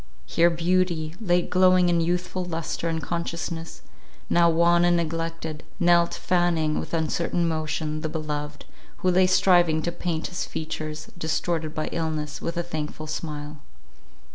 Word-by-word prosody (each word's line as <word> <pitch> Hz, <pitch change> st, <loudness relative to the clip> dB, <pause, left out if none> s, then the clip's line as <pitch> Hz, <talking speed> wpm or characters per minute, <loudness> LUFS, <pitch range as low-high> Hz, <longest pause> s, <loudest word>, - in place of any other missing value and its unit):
Here 170 Hz, +1 st, +4 dB
beauty, 170 Hz, -2 st, 0 dB
late 175 Hz, -4 st, +1 dB
glowing 185 Hz, -1 st, +5 dB
in 170 Hz, -1 st, +3 dB
youthful 180 Hz, +2 st, -1 dB
lustre 165 Hz, -1 st, -3 dB
and 160 Hz, -1 st, -2 dB
consciousness, 170 Hz, -1 st, -4 dB, 0.5 s
now 170 Hz, 0 st, +5 dB
wan 170 Hz, +1 st, +4 dB
and 175 Hz, 0 st, +4 dB
neglected, 165 Hz, -1 st, -3 dB, 0.2 s
knelt 175 Hz, -1 st, +4 dB
fanning 170 Hz, -4 st, +1 dB
with -, -, -4 dB
uncertain 170 Hz, +2 st, 0 dB
motion 155 Hz, -1 st, -2 dB
the 155 Hz, -, -2 dB
beloved, 150 Hz, -2 st, -4 dB, 0.4 s
who 185 Hz, -, +5 dB
lay 185 Hz, +1 st, +5 dB
striving 175 Hz, -4 st, +4 dB
to 170 Hz, -, -1 dB
paint 170 Hz, -2 st, -3 dB
his 175 Hz, -, -3 dB
features, 155 Hz, -1 st, -5 dB
distorted 160 Hz, -1 st, -1 dB
by 155 Hz, -, -1 dB
illness, 155 Hz, -3 st, -3 dB
with 170 Hz, +1 st, -3 dB
a 175 Hz, -, 0 dB
thankful 155 Hz, -2 st, -5 dB
smile. 150 Hz, -1 st, -5 dB
165 Hz, 140 wpm, -25 LUFS, 155-175 Hz, 0.5 s, glowing